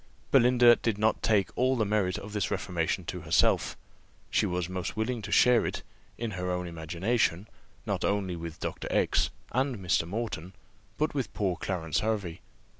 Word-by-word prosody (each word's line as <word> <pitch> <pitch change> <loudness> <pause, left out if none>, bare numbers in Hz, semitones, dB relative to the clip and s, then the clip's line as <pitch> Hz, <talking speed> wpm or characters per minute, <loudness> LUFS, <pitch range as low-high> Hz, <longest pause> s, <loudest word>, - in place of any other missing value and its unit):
Belinda 120 -2 +6
did 115 -4 -1
not 110 +1 +1
take 100 -4 +2
all 130 +2 +2
the 110 - +2
merit 100 -3 +1
of 105 +1 -8
this 105 -5 -1
reformation - - -1
to - - -5
herself: - - +2 0.5
she - - +2
was 90 -1 -2
most 95 +3 -4
willing 115 +2 -1
to 105 -1 -7
share 125 -2 +5
it, - - -3 0.3
in 115 -2 -3
her 90 -1 -3
own 90 0 -1
imagination, 85 +4 -1 0.4
not - - -2
only 100 -3 0
with 85 -1 -7
Dr. - - -4
X - - +2 0.2
and 130 -1 0
Mr. 90 -3 0
Moreton, 95 -3 -4 0.4
but 155 +1 0
with 135 -5 -2
poor 95 -4 0
Clarence 80 -6 -2
Hervey. 100 -5 -2
100 Hz, 170 wpm, -29 LUFS, 90-115 Hz, 0.5 s, Belinda